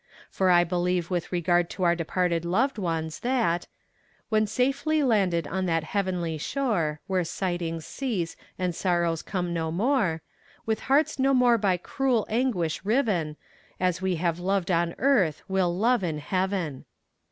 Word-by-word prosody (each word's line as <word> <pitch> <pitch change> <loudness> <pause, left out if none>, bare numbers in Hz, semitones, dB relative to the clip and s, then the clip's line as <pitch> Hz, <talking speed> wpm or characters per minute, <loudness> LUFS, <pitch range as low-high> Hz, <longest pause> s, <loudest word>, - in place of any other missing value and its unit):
For 190 -1 +1
I 175 -1 +6
believe 175 0 -1
with 175 -2 -2
regard 175 -1 +2
to 185 - -4
our 170 -1 +4
departed 170 0 0
loved 225 +9 +1
ones, 165 -4 -2
that 235 -9 0 0.6
When 215 -1 +2
safely 280 +6 +1
landed 190 - +2
on 190 +3 -2
that 165 -2 +1
heavenly 175 -3 -2
shore 170 - -1
Where 185 -2 0
sighings 170 -2 -3
cease 210 -12 -3 0.2
and 180 -1 -1
sorrows 170 -2 0
come 180 -3 -3
no 160 -1 -2
more 190 - +1 0.4
With 220 -1 0
hearts 280 +1 +3
no 270 +1 +3
more 245 -2 +4
by 195 -3 +2
cruel 245 +4 0
anguish 220 -10 0
riven, 195 - 0 0.4
As 180 0 0
we 190 -1 0
have 170 0 -1
loved 190 0 0
on 170 0 +1
earth 225 - +2
we'll 185 -2 +1
love 235 +1 +2
in 160 -4 -1
heaven. 185 -3 -2
180 Hz, 155 wpm, -26 LUFS, 170-220 Hz, 0.6 s, I